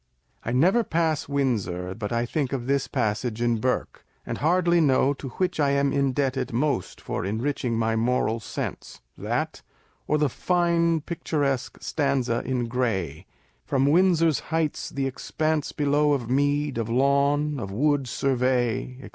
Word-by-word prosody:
I 120 - -3
never 180 - +4
pass 160 -6 0
Windsor 105 -10 -1
but 105 0 -5
I 115 0 0
think 140 +1 -2
of 125 -3 -3
this 140 +1 0
passage 110 +1 -1
in 120 -1 +1
Burke, 125 +3 -2 0.2
and - - -4
hardly 175 +2 +3
know 140 -1 +3
to 135 -1 -8
which 185 -3 0
I 145 -2 +3
am 140 0 +2
indebted 135 -2 0
most 120 -6 -1
for - - -4
enriching 115 +3 -1
my 115 0 +1
moral 115 0 +1
sense, - - -6
that - - -3 0.5
or 150 - +2
the 150 -1 +2
fine 170 +2 +1
picturesque 145 -5 -2
stanza 135 -5 0
in 125 -2 -1
Gray, 95 - -2 0.4
From 135 -1 +1
Windsor's 165 0 +4
heights 160 -1 -1
the 140 -1 -2
expanse 155 +3 -1
below 145 0 +2
Of 125 -4 -2
mead, 145 -1 +1
of 115 -1 -2
lawn, 140 +3 +2
of 100 -5 -5
wood 140 +5 +1
survey, 125 -1 0
&c. - - -9
135 Hz, 150 wpm, -25 LUFS, 120-150 Hz, 0.5 s, never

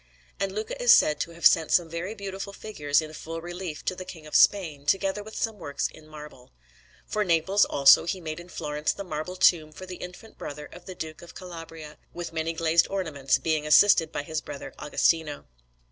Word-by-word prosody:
And 195 0 -1
Luca 220 - -5
is - - +6
said 150 - +5
to 170 - -3
have 170 - -6
sent 160 -2 +6
some 175 -2 +3
very 170 +6 -5
beautiful 200 -1 -6
figures 150 -9 0
in 155 0 -9
full 165 +1 -6
relief 175 -1 -7
to - - 0
the 185 - -7
King 170 -4 -11
of 150 - -12
Spain, 160 -8 +3
together 195 +3 +1
with 220 +1 -11
some 220 -2 -2
works 145 -4 -2
in 155 - -16
marble. 150 -5 -12 0.6
For 215 - -1
Naples, 185 +3 +3
also, 140 -1 +6
he 185 +2 -2
made 155 -1 -6
in 175 +1 -12
Florence 150 -2 -2
the 200 - -6
marble 180 0 -5
tomb 165 -4 +3
for 185 +4 -10
the 185 -1 -8
infant 180 +5 -11
brother 150 +1 -7
of 175 +4 -14
the 185 - -7
Duke 160 -2 -7
of 175 - -13
Calabria, 165 -4 -10 0.2
with 175 -1 -6
many 160 0 -2
glazed 165 0 +3
ornaments, 155 -9 0
being 155 -2 -1
assisted 165 0 +6
by - - -3
his 155 +1 -3
brother 140 - -8
Agostino. 150 0 0
165 Hz, 205 wpm, -26 LUFS, 155-185 Hz, 0.6 s, is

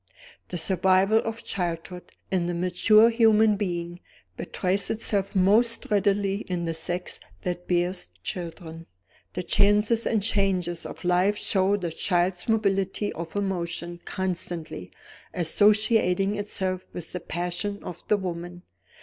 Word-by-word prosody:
The 180 - -4
survival 190 +4 +3
of 225 0 -4
childhood, 175 -1 -4 0.2
in 180 -2 +1
the 175 - -2
mature 215 +6 +4
human 220 -2 +4
being, 175 -3 -3 0.4
betrays 185 - -1
itself 205 -2 -1
most 215 +5 +3
readily 200 -1 +2
in 180 -4 -4
the 165 - -1
sex 175 +3 -3 0.2
that 175 0 -4
bears 175 - 0
children. 165 - -7 0.5
The 180 - -3
chances 210 +4 +3
and 215 -3 +1
changes 190 -5 0
of - - -10
life 180 +4 +3
show 195 0 +2
the 175 -4 -4
child's 175 +3 0
mobility 200 -2 0
of 165 +2 -7
emotion 175 -3 -3
constantly 175 - -4 0.5
associating 205 +2 +3
itself 190 -3 -1
with 175 -2 -5
the 180 - -3
passions 175 +5 -3
of 175 -1 -7
the 210 - +3
woman. 175 -1 -6
185 Hz, 125 wpm, -26 LUFS, 175-205 Hz, 0.5 s, mature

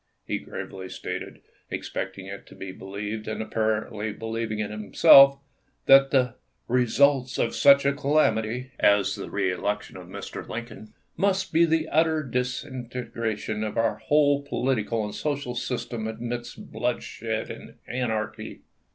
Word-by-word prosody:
He - - -2
gravely 95 -1 -7
stated, - - -6 0.3
expecting 95 0 -5
it 100 0 -9
to - - -14
be 95 - -7
believed, 105 +3 -6
and 110 - -3
apparently 110 0 -1
believing 110 0 -4
it 105 -1 -3
himself, 135 +6 +7 0.5
that 135 0 +7
the 125 -4 +2 0.2
" - - -47
results 130 +2 +3
of 115 - 0
such 140 0 +6
a 140 - +3
ca 140 - -7
lamity 125 -4 +1
[as 100 -1 +4
the - - -6
reelection 100 +3 -2
of - - -10
Mr. - - -7
Lincoln] 110 -2 -7 0.3
must 195 -2 +1
be 165 +1 +6
the 160 -1 +1
utter 160 0 +2
disintegration 120 -4 -3
of 110 +1 -4
our 115 0 +1
whole 145 -1 +3
political 120 -6 -1
and 105 - -6
social 140 -4 -2
system 120 -2 -3
amidst 120 +2 -6
bloodshed 110 -1 -3
and - - -11
anarchy." 115 -4 -3
120 Hz, 140 wpm, -26 LUFS, 110-135 Hz, 0.5 s, himself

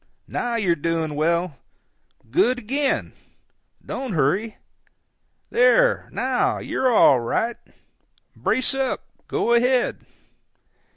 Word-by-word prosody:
now 240 -1 -2
you're 190 -7 +1
doing 165 0 -2
well—good 170 - -2
again—don't 265 -1 -5
hurry—there, 225 - -1
now, - - 0
you're 260 -1 -1
all 140 - +5
right—brace 235 - -4
up, 270 -1 -2 0.2
go 235 - 0
ahead." 245 +1 +2
230 Hz, 70 wpm, -22 LUFS, 165-255 Hz, 0.2 s, all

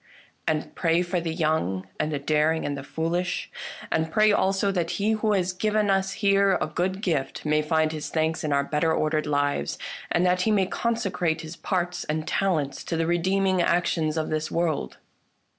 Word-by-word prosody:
And 155 -1 -1
pray 170 0 +2
for 175 0 -1
the 165 -1 -2
young 155 - 0
and 155 - 0
the 145 - -1
daring 155 +3 +1
and 145 - -2
the 140 - -5
foolish. 175 +5 -2 0.4
And 160 0 0
pray 215 +4 +4
also 195 0 +2
that 175 -3 -1
he 210 +2 +1
who 215 -1 +1
has 185 -2 +1
given 210 +1 +1
us 195 0 +1
here 200 -2 +3
a - - 0
good 185 +5 -2
gift 150 -7 -1
may 150 0 +3
find 155 0 +1
his 155 -1 -5
thanks 160 0 0
in 155 - -1
our 140 0 +3
better 150 +3 0
ordered 155 -1 0
lives, 145 - 0 0.3
and 175 - +2
that 180 0 +2
he 220 - +1
may 200 -3 +3
consecrate 190 -7 -1
his 160 +1 -8
parts 180 0 -2
and 155 +1 -2
talents 155 -8 0
to 165 - -2
the 165 - +1
redeeming 185 +2 +2
actions 165 -2 +1
of 160 - -1
this 155 0 -1
world." 165 -3 -1
165 Hz, 190 wpm, -25 LUFS, 155-190 Hz, 0.4 s, pray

